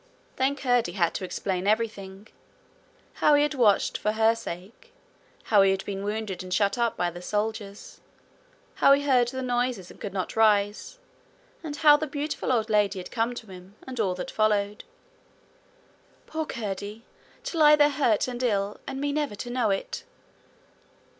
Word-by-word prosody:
Then 270 Hz, +2 st, +1 dB
Curdie 245 Hz, -4 st, +1 dB
had 170 Hz, -4 st, +1 dB
to -, -, -4 dB
explain 185 Hz, 0 st, -3 dB
everything 210 Hz, -2 st, -2 dB, 0.9 s
how 300 Hz, -, +4 dB
he 290 Hz, -, +4 dB
had 295 Hz, -, 0 dB
watched 230 Hz, -7 st, +2 dB
for 210 Hz, -, 0 dB
her 220 Hz, +1 st, +4 dB
sake, 200 Hz, -2 st, -9 dB, 0.5 s
how 210 Hz, -3 st, +4 dB
he 195 Hz, -, +5 dB
had 195 Hz, 0 st, -1 dB
been 195 Hz, -1 st, -4 dB
wounded 210 Hz, -3 st, -3 dB
and 185 Hz, 0 st, -9 dB
shut 200 Hz, +2 st, +2 dB
up 235 Hz, -2 st, 0 dB
by 175 Hz, -1 st, 0 dB
the 175 Hz, +1 st, -9 dB
soldiers, 210 Hz, +1 st, -4 dB, 0.7 s
how 275 Hz, -, +5 dB
he 280 Hz, +1 st, +2 dB
heard 255 Hz, -4 st, +3 dB
the 260 Hz, +1 st, -4 dB
noises 245 Hz, -6 st, -1 dB
and -, -, -17 dB
could 205 Hz, -, -4 dB
not 185 Hz, -1 st, -4 dB
rise, 210 Hz, -, +2 dB, 0.7 s
and 300 Hz, -2 st, -5 dB
how 295 Hz, -1 st, +6 dB
the 310 Hz, +1 st, -3 dB
beautiful 290 Hz, -1 st, -3 dB
old 225 Hz, -3 st, +1 dB
lady 205 Hz, -2 st, +2 dB
had 180 Hz, -, -7 dB
come 235 Hz, +1 st, -1 dB
to 220 Hz, -5 st, -9 dB
him, 185 Hz, +2 st, -13 dB
and 255 Hz, -2 st, -7 dB
all 190 Hz, -4 st, +1 dB
that 180 Hz, -, -6 dB
followed. 210 Hz, -1 st, 0 dB, 1.4 s
'Poor 315 Hz, -1 st, -4 dB
Curdie! 210 Hz, 0 st, -5 dB, 0.4 s
to 335 Hz, -, -4 dB
lie 300 Hz, -1 st, +8 dB
there 295 Hz, 0 st, +5 dB
hurt 265 Hz, -7 st, +1 dB
and 245 Hz, -1 st, -5 dB
ill, 205 Hz, -4 st, 0 dB
and 270 Hz, 0 st, -4 dB
me 285 Hz, +1 st, -1 dB
never 295 Hz, -7 st, -1 dB
to 240 Hz, +4 st, -6 dB
know 245 Hz, -3 st, +1 dB
it!' 195 Hz, -, -3 dB
220 Hz, 175 wpm, -26 LUFS, 200-260 Hz, 1.4 s, lie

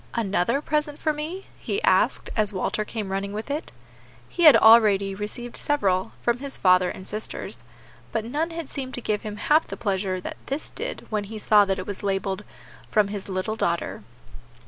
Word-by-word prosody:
"Another 220 Hz, +4 st, +1 dB
present 300 Hz, -1 st, -1 dB
for 310 Hz, -, 0 dB
me?" 320 Hz, +6 st, -5 dB
he 405 Hz, -, -2 dB
asked, -, -, +2 dB
as 215 Hz, -2 st, +2 dB
Walter 205 Hz, +2 st, -1 dB
came 210 Hz, -2 st, -5 dB
running 195 Hz, +1 st, -2 dB
with 215 Hz, +6 st, -5 dB
it. 300 Hz, +3 st, -3 dB, 0.6 s
He 345 Hz, -, 0 dB
had 305 Hz, -, +10 dB
already 210 Hz, -3 st, +6 dB
received 210 Hz, +4 st, -5 dB
several, 195 Hz, -11 st, 0 dB
from 240 Hz, 0 st, +1 dB
his 280 Hz, 0 st, -6 dB
father 185 Hz, -1 st, +4 dB
and 185 Hz, -, -8 dB
sisters, 215 Hz, +1 st, -5 dB, 0.5 s
but 225 Hz, -1 st, -1 dB
none 300 Hz, +8 st, -1 dB
had 330 Hz, -3 st, -6 dB
seemed 265 Hz, -2 st, -5 dB
to 245 Hz, -, -6 dB
give 210 Hz, -2 st, -1 dB
him 210 Hz, -1 st, -6 dB
half 305 Hz, +8 st, +3 dB
the -, -, -6 dB
pleasure 190 Hz, -3 st, -1 dB
that -, -, -7 dB
this 275 Hz, +3 st, -3 dB
did -, -, -5 dB
when 210 Hz, -1 st, -1 dB
he 220 Hz, +2 st, -7 dB
saw 210 Hz, -1 st, +5 dB
that 195 Hz, -1 st, 0 dB
it 185 Hz, -, -5 dB
was 200 Hz, -2 st, -6 dB
labelled, 195 Hz, 0 st, -1 dB, 0.5 s
"From 210 Hz, -2 st, +3 dB
his 200 Hz, -1 st, -6 dB
little 190 Hz, +3 st, -2 dB
daughter." 170 Hz, -5 st, -1 dB
215 Hz, 190 wpm, -25 LUFS, 195-275 Hz, 0.6 s, had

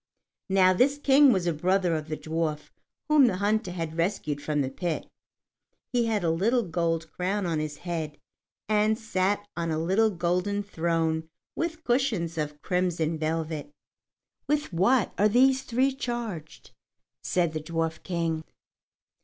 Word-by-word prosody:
Now 185 Hz, -1 st, +5 dB
this 270 Hz, +9 st, +3 dB
King 280 Hz, -1 st, +6 dB
was 190 Hz, -6 st, +1 dB
a 170 Hz, -, +1 dB
brother 180 Hz, +2 st, +1 dB
of 155 Hz, -1 st, -4 dB
the 155 Hz, -1 st, -3 dB
dwarf 155 Hz, -1 st, -3 dB, 0.4 s
whom 300 Hz, -4 st, +6 dB
the 190 Hz, -, +1 dB
hunter 210 Hz, +1 st, +1 dB
had 165 Hz, -3 st, -4 dB
rescued 160 Hz, -5 st, -1 dB
from 150 Hz, -1 st, 0 dB
the 135 Hz, -1 st, -2 dB
pit. 170 Hz, +3 st, -3 dB, 0.9 s
He 240 Hz, -2 st, +2 dB
had 215 Hz, -4 st, 0 dB
a 165 Hz, -, +2 dB
little 225 Hz, +9 st, +2 dB
gold 165 Hz, -2 st, -1 dB
crown 190 Hz, +2 st, -1 dB
on 165 Hz, -3 st, 0 dB
his 155 Hz, -1 st, -4 dB
head, 160 Hz, -4 st, -4 dB, 0.5 s
and 215 Hz, +1 st, +2 dB
sat 205 Hz, -2 st, -1 dB
on 170 Hz, -1 st, -2 dB
a 155 Hz, -, 0 dB
little 190 Hz, +7 st, +2 dB
golden 180 Hz, +2 st, -1 dB
throne 165 Hz, -3 st, -1 dB, 0.3 s
with 325 Hz, -1 st, -3 dB
cushions 235 Hz, -10 st, 0 dB
of 150 Hz, -1 st, -4 dB
crimson 170 Hz, -3 st, 0 dB
velvet. 155 Hz, -1 st, -2 dB, 0.8 s
"With 295 Hz, -7 st, 0 dB
what 205 Hz, +7 st, +3 dB
are 210 Hz, +1 st, +5 dB
these 260 Hz, +4 st, +4 dB
three 260 Hz, +2 st, +1 dB
charged?" 235 Hz, -, -5 dB, 0.5 s
said 170 Hz, -3 st, 0 dB
the 155 Hz, -, -3 dB
Dwarf 165 Hz, 0 st, -2 dB
King. 165 Hz, -3 st, -2 dB
180 Hz, 150 wpm, -27 LUFS, 160-215 Hz, 0.9 s, King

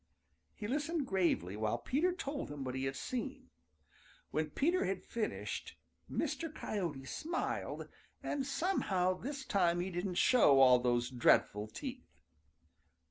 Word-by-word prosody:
He 205 Hz, -, -5 dB
listened 295 Hz, +4 st, -1 dB
gravely 170 Hz, -, +1 dB
while 110 Hz, +2 st, 0 dB
Peter 305 Hz, -, +1 dB
told 290 Hz, -6 st, -4 dB
him 145 Hz, -2 st, -5 dB
what 130 Hz, -1 st, -3 dB
he 130 Hz, +1 st, -2 dB
had 135 Hz, 0 st, -2 dB
seen. 230 Hz, -, -4 dB, 0.8 s
When 155 Hz, 0 st, 0 dB
Peter 335 Hz, -, +1 dB
had 190 Hz, 0 st, -2 dB
finished, 225 Hz, -2 st, -4 dB, 0.3 s
Mr. 330 Hz, -2 st, -2 dB
Coyote 170 Hz, -, -3 dB
smiled, 330 Hz, -, -3 dB, 0.4 s
and 280 Hz, -, -1 dB
somehow 260 Hz, -, +1 dB
this 270 Hz, +7 st, -5 dB
time 175 Hz, -4 st, +2 dB
he 185 Hz, +2 st, -2 dB
didn't 180 Hz, +1 st, -2 dB
show 175 Hz, -, +6 dB
all 125 Hz, -2 st, +8 dB
those 120 Hz, 0 st, +1 dB
dreadful 110 Hz, -4 st, +3 dB
teeth. 255 Hz, -, -8 dB
185 Hz, 135 wpm, -35 LUFS, -, 0.8 s, all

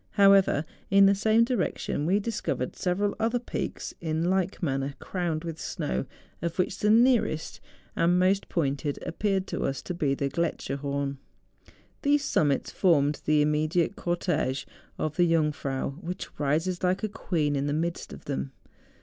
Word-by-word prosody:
However, 195 Hz, -6 st, +5 dB, 0.2 s
in 195 Hz, 0 st, +7 dB
the 195 Hz, -, +6 dB
same 220 Hz, +3 st, +3 dB
direction 220 Hz, -, -1 dB
we 195 Hz, +4 st, +3 dB
discovered 220 Hz, +1 st, -3 dB
several 200 Hz, +3 st, 0 dB
other 230 Hz, +2 st, +1 dB
THE 245 Hz, -, -7 dB
JUNGFRAU. -, -, -17 dB
79 -, -, -1 dB
peaks -, -, -8 dB
in 160 Hz, +1 st, 0 dB
like 190 Hz, 0 st, -1 dB
manner 135 Hz, -2 st, -1 dB
crowned 170 Hz, -4 st, -3 dB
with 165 Hz, -2 st, -5 dB
snow, 65 Hz, +1 st, -2 dB, 0.3 s
of 170 Hz, 0 st, -3 dB
which 185 Hz, -, 0 dB
the 210 Hz, -, +2 dB
nearest 230 Hz, -8 st, +3 dB, 0.4 s
and 175 Hz, +2 st, +3 dB
most 190 Hz, +2 st, +2 dB
pointed 145 Hz, -2 st, -1 dB
appeared 195 Hz, +1 st, 0 dB
to -, -, -4 dB
us 135 Hz, -1 st, -2 dB
to 180 Hz, -, -4 dB
be 145 Hz, -5 st, 0 dB
the 140 Hz, -, -1 dB
Grletscherhorn. 140 Hz, -3 st, -2 dB, 0.8 s
These 290 Hz, 0 st, +2 dB
summits 145 Hz, -, +1 dB
formed 150 Hz, -6 st, +2 dB
the 150 Hz, -1 st, +4 dB
im¬ -, -, +2 dB
mediate 155 Hz, +5 st, +1 dB
cortege 155 Hz, -6 st, -1 dB, 0.3 s
of 155 Hz, 0 st, -3 dB
the 175 Hz, -2 st, +4 dB
Jungfrau, 150 Hz, -5 st, 0 dB
which 180 Hz, +2 st, -6 dB
rises 160 Hz, +5 st, 0 dB
like 185 Hz, +3 st, +1 dB
a -, -, +2 dB
queen 160 Hz, -8 st, -1 dB
in 140 Hz, +1 st, 0 dB
the -, -, 0 dB
midst 165 Hz, +3 st, -2 dB
of -, -, -10 dB
them. 65 Hz, 0 st, -3 dB
170 Hz, 165 wpm, -27 LUFS, 145-195 Hz, 0.8 s, in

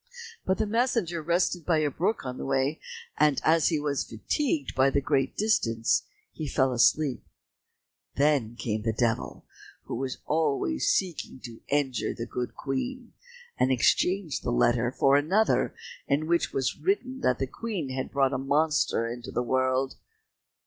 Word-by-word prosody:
But 190 Hz, 0 st, +2 dB
the 220 Hz, -, +1 dB
messenger 220 Hz, -6 st, 0 dB
rested 175 Hz, +1 st, 0 dB
by 165 Hz, 0 st, +2 dB
a 150 Hz, -2 st, +1 dB
brook 185 Hz, +3 st, -1 dB
on 125 Hz, 0 st, -5 dB
the -, -, -4 dB
way, 135 Hz, +3 st, 0 dB, 0.4 s
and 150 Hz, -3 st, +4 dB
as 160 Hz, 0 st, +4 dB
he 160 Hz, -3 st, +1 dB
was 145 Hz, -2 st, -1 dB
fatigued 145 Hz, -, -2 dB
by 135 Hz, +1 st, +4 dB
the 140 Hz, -, +1 dB
great 135 Hz, -1 st, 0 dB
distance, 115 Hz, -, +1 dB, 0.2 s
he 155 Hz, -, -5 dB
fell 130 Hz, -2 st, +1 dB
asleep. 130 Hz, +3 st, +2 dB, 0.9 s
Then 140 Hz, -6 st, +2 dB
came 110 Hz, -3 st, -2 dB
the 110 Hz, +1 st, -1 dB
Devil, 115 Hz, +1 st, -1 dB, 0.4 s
who -, -, -7 dB
was 130 Hz, +1 st, -3 dB
always 145 Hz, -, 0 dB
seeking 175 Hz, -7 st, -1 dB
to 115 Hz, -2 st, -10 dB
injure 140 Hz, -3 st, 0 dB
the 115 Hz, -, -4 dB
good 125 Hz, +1 st, -4 dB
Queen, 245 Hz, -, -4 dB, 0.5 s
and 130 Hz, -, +3 dB
exchanged 175 Hz, -, +2 dB
the -, -, -3 dB
letter 120 Hz, -, +2 dB
for 135 Hz, +1 st, +3 dB
another, 190 Hz, +10 st, +2 dB, 0.3 s
in 145 Hz, +2 st, +1 dB
which 170 Hz, +1 st, +1 dB
was 130 Hz, -1 st, -1 dB
written 265 Hz, -10 st, -1 dB
that 125 Hz, -, +1 dB
the 135 Hz, -, -1 dB
Queen 185 Hz, -, -4 dB
had 130 Hz, 0 st, -3 dB
brought 135 Hz, -1 st, +1 dB
a 130 Hz, -, -1 dB
monster 145 Hz, -3 st, +1 dB
into 120 Hz, +1 st, -6 dB
the 120 Hz, -, -1 dB
world. 130 Hz, +2 st, 0 dB
140 Hz, 160 wpm, -27 LUFS, 130-165 Hz, 0.9 s, and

